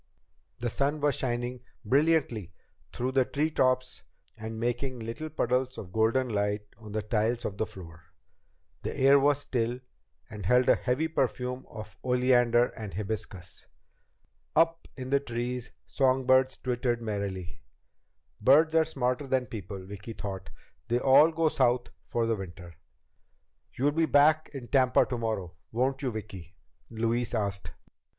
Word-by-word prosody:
The 120 +2 -2
sun 145 +5 0
was 145 -1 +2
shining 120 0 -2 0.3
brilliantly 130 - +1 0.4
through 125 +2 -2
the 130 0 +3
tree 150 +5 -1
tops 130 -2 +1 0.3
and 110 0 -6
making 120 +2 -2
little 115 +8 -5
puddles 130 -2 0
of 90 - -8
golden 110 +5 +2
light 105 -1 0 0.2
on 105 -2 -10
the 110 -1 -1
tiles 110 +3 0
of 100 - -4
the 110 - 0
floor. 85 -4 -12 0.8
The - - -4
air 135 +1 +6
was 145 +1 +3
still, 120 -2 -1 0.5
and 105 -3 -8
held 125 +2 +4
a - - +8
heavy 130 +6 0
perfume 125 -4 -2
of 110 -1 -10
oleander 125 -1 +3
and 105 -3 -7
hibiscus. 100 -3 -6 0.9
Up 165 +1 +2
in 130 0 -6
the 140 - +4
trees, 125 -1 -4 0.2
songbirds 130 0 +3
twittered 120 -1 -1
merrily. 100 -5 -4 0.8
Birds 155 +8 +5
are 160 -1 +4
smarter 135 -2 -1
than 130 -1 +1
people, 100 -4 -7
Vicki 105 +3 -8
thought, 95 -4 -6 0.4
they 120 0 +2
all 140 +5 +6
go 165 0 +1
South 125 -4 +2 0.2
for 120 -1 0
the 115 0 +1
winter. 90 -3 -9 1.0
"You'll 140 +3 +2
be 160 +2 +1
back 155 +2 +4
in 135 -4 -8
Tampa 130 -1 +4
tomorrow, 110 -8 -3 0.2
won't 130 +4 0
you, 135 - 0
Vicki?" 95 -5 -8 0.3
Louise 115 +2 -1
asked. 100 -2 -2
120 Hz, 145 wpm, -29 LUFS, 110-135 Hz, 1.0 s, a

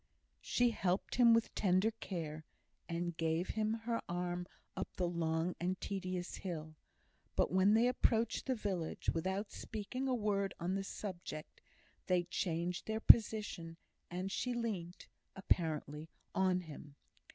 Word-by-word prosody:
She 245 -1 +2
helped 185 -3 0
him 240 -2 +7
with 230 0 +3
tender 190 +2 +3
care, 165 -8 -5 0.5
and 170 0 -2
gave 165 +2 0
him 215 0 0
her 235 -1 0
arm 175 0 -2 0.3
up 190 - -4
the 180 - +1
long 165 0 0
and 185 +2 -1
tedious 185 -2 -3
hill; 160 -4 -5 0.6
but - - +2
when 190 +3 +5
they 230 +2 +5
approached 235 -2 +1
the 260 - +2
village, 190 -7 -2
without 190 +5 -2
speaking 235 +5 -4
a 255 - +2
word 200 -3 0
on 175 +2 -1
the 195 0 -1
subject, 180 -6 -6 0.5
they 180 -1 +3
changed 175 0 -2
their 220 0 -1
position, 210 -8 +5 0.3
and 185 +2 -3
she 245 +4 -1
leant 195 -7 -3 0.3
(apparently) 160 -4 0 0.2
on 185 -1 +2
him. 150 -3 -10
185 Hz, 140 wpm, -36 LUFS, 170-215 Hz, 0.6 s, him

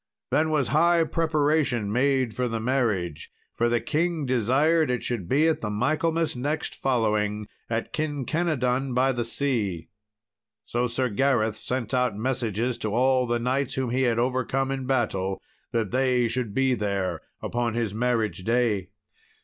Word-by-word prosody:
Then 155 +1 +2
was 150 -5 +1
high 170 +2 +4
preparation 150 -8 +1
made 130 -1 +1
for 125 +1 -1
the 115 -1 -2
marriage, 110 - -1 0.2
for 120 +1 +1
the 120 0 +2
king 165 +1 -1
desired 135 +6 +2
it 125 -2 -1
should 105 -8 -3
be 150 +4 +4
at 160 - +1
the 105 - -2
Michaelmas 160 +8 0
next 145 +5 -2
following, 105 -4 0 0.2
at 115 0 -2
Kinkenadon 140 -4 -1
by 130 +2 +3
the 120 -2 -1
Sea. 115 - -1 0.7
So 120 +2 -1
Sir 125 +2 -1
Gareth 110 -1 +1
sent 125 +1 -3
out 125 -5 +1
messages 120 0 -1
to 110 - -2
all 130 0 +3
the 120 0 +1
knights 130 +3 -1
whom 130 -3 -1
he 130 +2 +1
had 120 -3 +2
overcome 130 +2 0
in 135 -1 -3
battle 95 -7 0 0.3
that 115 -4 -1
they 125 -2 +2
should 115 -3 -3
be 135 -1 +3
there 100 -4 -2 0.2
upon 120 -1 -2
his 115 -4 -1
marriage 115 -4 0
day. 110 -5 +1
125 Hz, 155 wpm, -26 LUFS, 115-135 Hz, 0.7 s, high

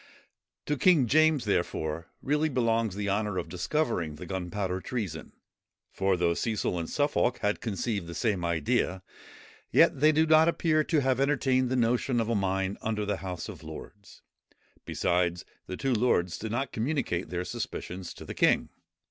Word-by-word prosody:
To 150 - -1
King 155 -1 +5
James, 155 +1 +3
therefore, 80 -5 -1 0.2
really 150 +3 +1
belongs 115 -5 +1
the 100 0 -3
honour 105 -1 0
of 90 - -2
discovering 90 - -1
the 75 - -8
gunpowder 95 0 -3
treason; 100 -11 -4 0.6
for, 95 -1 +1
though 85 -1 +2
Cecil 105 -2 -1
and 85 - -4
Suffolk 145 -4 +1
had 105 0 0
conceived 105 -4 -2
the 85 - -7
same 105 -7 0
idea, 85 +2 0 0.7
yet - - +4
they 155 +2 +6
do 155 +1 +3
not 160 0 +6
appear 160 -2 +2
to 155 -4 +2
have 130 -1 +1
entertained 135 -2 +2
the 130 - 0
notion 120 +1 +1
of 115 0 -1
a 115 - +1
mine 95 0 -1
under 110 -1 -1
the 100 -1 -1
House 90 -3 -5
of - - -9
Lords. 100 -1 -11 0.6
Besides, 85 -1 0 0.2
the 95 - -5
two 135 -1 0
lords 90 -8 +1
did 110 0 -4
not 130 +4 -2
communicate 110 - -1
their 90 +1 -3
suspicions 90 0 -5
to - - -10
the - - -6
king. - - +3
105 Hz, 165 wpm, -28 LUFS, 90-130 Hz, 0.7 s, they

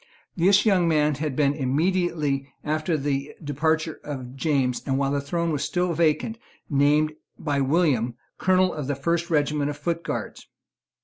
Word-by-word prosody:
This 190 +5 +4
young 185 -5 +4
man 150 -2 +3
had 145 -1 -3
been, 140 -1 +3
immediately 150 -1 0
after 155 +2 0
the 140 0 -2
departure 160 +2 0
of 130 -3 -6
James, 135 -4 0
and 135 -1 +1
while 135 0 +1
the 140 0 0
throne 170 +4 -1
was 145 -2 -1
still 180 -1 0
vacant, 165 +8 +1 0.3
named 150 +2 +3 0.2
by 145 -3 -1
William 135 -5 +2 0.2
Colonel 185 0 +3
of 150 -4 -4
the 145 - -1
First 170 +5 -1
Regiment 150 -2 +1
of 145 - -5
Foot 170 +3 -2
Guards. - - -5
150 Hz, 160 wpm, -25 LUFS, 140-170 Hz, 0.3 s, This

